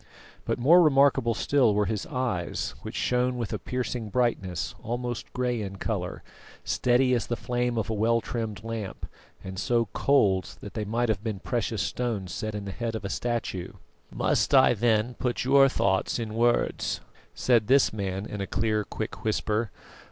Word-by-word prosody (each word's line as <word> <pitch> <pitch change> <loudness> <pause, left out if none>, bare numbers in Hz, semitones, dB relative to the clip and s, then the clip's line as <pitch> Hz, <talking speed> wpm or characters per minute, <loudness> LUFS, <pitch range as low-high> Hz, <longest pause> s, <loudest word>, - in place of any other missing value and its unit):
But - - 0
more 165 +9 +6
remarkable 135 -6 +4
still 130 -7 +3
were 105 0 +2
his 105 -2 -3
eyes, 120 -9 -2
which - - -7
shone 125 0 +1
with 115 -3 -3
a - - -2
piercing 120 -3 -3
brightness, 100 -7 -1
almost 120 0 -4
grey 125 -2 -1
in 95 -1 -5
colour, - - -3 0.4
steady 125 +1 +2
as 120 - 0
the 120 - -1
flame 120 0 -1
of 110 - -1
a 110 - -2
well 115 +2 +2
trimmed 110 -4 -4
lamp, 115 -4 -5 0.4
and 95 0 -6
so 115 0 +1
cold 100 -10 +2
that 100 - -8
they 110 -2 -3
might 115 +3 0
have 105 -2 0
been 110 -3 -2
precious 115 0 -2
stones 110 -7 -2
set 110 -1 -4
in 105 -1 -5
the 100 - -4
head 115 +2 -3
of 110 - -5
a - - -2
statue. 115 -5 -3 0.4
"Must - - +1
I 130 -2 +7
then 115 +1 +1
put 125 -2 -1
your 135 +1 +6
thoughts 95 -6 +1
in 115 -2 -4
words?" 120 +1 +1 0.3
said 115 -4 +2
this 135 -1 +4
man 100 -2 -3
in 105 -2 -5
a 100 - -3
clear 110 -1 0
quick 110 +2 -6
whisper. 110 0 0
115 Hz, 175 wpm, -27 LUFS, 105-125 Hz, 0.4 s, I